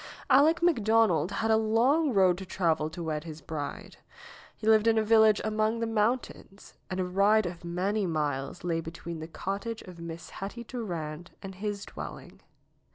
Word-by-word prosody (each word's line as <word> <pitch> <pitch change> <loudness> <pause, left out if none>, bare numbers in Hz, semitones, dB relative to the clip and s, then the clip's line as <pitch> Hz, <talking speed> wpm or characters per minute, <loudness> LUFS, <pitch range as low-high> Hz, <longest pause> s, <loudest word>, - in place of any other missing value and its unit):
Aleck 310 +5 +5
McDonald 225 - +3
had 225 +2 0
a 220 - +5
long 245 +8 +3
road 190 -4 +3
to - - -6
travel 160 -5 0
to 170 +2 -7
wed 155 -2 -2
his 160 -2 -8
bride. 145 -1 -6 0.6
He - - -8
lived 220 0 +5
in 225 0 +4
a 220 - +3
village 220 -1 +5
among 215 +1 0
the 230 - 0
mountains, 225 -2 -2 0.2
and 185 - -3
a 185 - +1
ride 200 +3 +3
of 175 -1 -6
many 190 +4 -1
miles 150 -1 -2
lay 165 -2 0
between 165 0 -7
the 160 - -6
cottage 200 +6 -4
of 180 -2 -12
Miss 170 0 -8
Hetty 205 +5 -6
Durand 175 -9 -5
and 195 0 -7
his 205 +1 -4
dwelling. - - -9
195 Hz, 170 wpm, -29 LUFS, 170-220 Hz, 0.6 s, Aleck